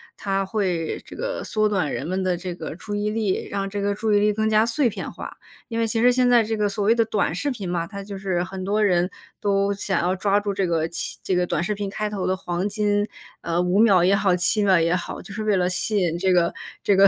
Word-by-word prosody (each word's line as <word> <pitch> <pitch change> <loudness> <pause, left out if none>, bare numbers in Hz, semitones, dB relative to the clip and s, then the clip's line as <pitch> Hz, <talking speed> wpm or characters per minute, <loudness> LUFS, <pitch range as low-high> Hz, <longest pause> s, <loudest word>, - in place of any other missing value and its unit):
它 195 -1 -1
会 185 -5 -1
这 - - -11
个 - - -3
缩 215 -1 +1
短 185 -8 0
人 - - -3
们 185 +2 -1
的 185 -2 0
这 180 0 -5
个 160 -3 -7
注 205 +4 -7
意 205 +1 0
力， 210 -3 -1
让 195 -1 -2
这 200 +1 -4
个 200 0 0
注 215 +1 0
意 205 - +5
力 210 +1 +3
更 220 +1 0
加 215 0 +4
碎 240 +4 +1
片 225 - -4
化。 - - -8 0.3
因 230 -1 -2
为 230 - +1
其 225 +1 0
实 245 +2 +5
现 250 0 +3
在 240 -2 +6
这 220 +1 -2
个 210 -1 +1
所 200 0 -2
谓 220 - +5
的 230 -1 +3
短 215 -6 0
视 285 - -1
频 220 -8 -4
嘛， 170 -1 -2
它 200 +2 -7
就 200 0 -7
是 190 -2 -1
很 190 +1 -6
多 210 +3 +1
人 180 -3 +2 0.3
都 200 -1 +1
想 195 -2 -1
要 180 +2 +1
抓 200 +1 +2
住 205 -1 -2
这 195 -1 0
个 165 -2 0
其 165 -1 -5
这 185 - 0
个 180 0 +1
短 165 - 0
视 210 +4 -1
频 200 -1 -4
开 210 +2 -3
头 205 -3 -3
的 185 - 0
黄 180 +2 -2
金， 205 0 +1 0.3
呃， 170 0 -1
5 180 +2 +2
秒 200 -6 +6
也 190 +2 +4
好， 195 -3 +2
7 180 +4 +2
秒 190 -3 +5
也 165 +1 +2
好， 180 - -5
就 200 - -10
是 215 - -4
为 210 -1 +2
了 180 -1 +2
吸 185 +4 0
引 175 -4 +1
这 190 +1 +2
个 175 -2 +3 0.3
这 200 - +3
个 195 +1 +7
200 Hz, 285 characters per minute, -23 LUFS, 180-210 Hz, 0.3 s, 个